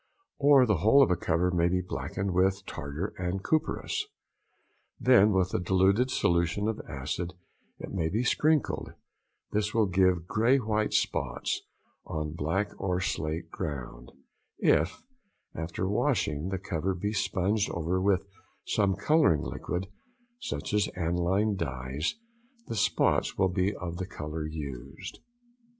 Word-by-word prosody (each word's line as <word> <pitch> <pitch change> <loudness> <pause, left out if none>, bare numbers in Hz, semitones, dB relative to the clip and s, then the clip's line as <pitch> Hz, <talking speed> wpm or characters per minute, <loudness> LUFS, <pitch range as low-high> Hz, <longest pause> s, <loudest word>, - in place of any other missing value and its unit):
|108| - - 0
Or 140 -3 +8
the 105 -5 +2
whole 110 - +6
of 95 - +2
a - - +4
cover 85 +2 +1
may 85 -1 +2
be 90 +1 +1
blacked 90 - -5
with 95 0 +1
tartar 75 +6 -5
and 90 +2 -2
copperas, 155 -1 -1 0.9
then 115 -4 +6
with 95 -2 +1
a - - +1
diluted 95 +7 +3
solution 85 -1 +1
of 110 - -2
acid 75 +6 -4 0.4
it - - -8
may 80 -4 0
be 110 +7 0
sprinkled, 155 +4 +1 0.6
this 105 0 -1
will 110 -2 +4
give 90 -2 +2
grey 115 +8 +3
white 110 -3 0
spots - - 0 0.4
on 75 -1 -4
black 85 +6 -1
or 90 -2 0
slate 85 -3 -3
ground: - - -6 0.5
if, 80 +4 +2 0.5
after 80 +3 -3
washing, 95 - 0
the 95 - -2
cover 95 0 -2
be 105 +4 -2
sponged 100 0 0
over 85 +3 -1
with 95 -1 +2 0.4
some 100 -2 +1
colouring 150 - +3
liquid, 90 +2 -3 0.5
such - - -4
as 105 -1 +3
analine 90 +5 +1
dyes, 65 0 -3 0.5
the - - -5
spots 100 - +1
will 95 - +3
be 90 +2 +1
of 85 -1 -5
the 95 0 -4
colour 75 -3 -5
used. 75 +2 -7
95 Hz, 140 wpm, -29 LUFS, 80-105 Hz, 0.9 s, Or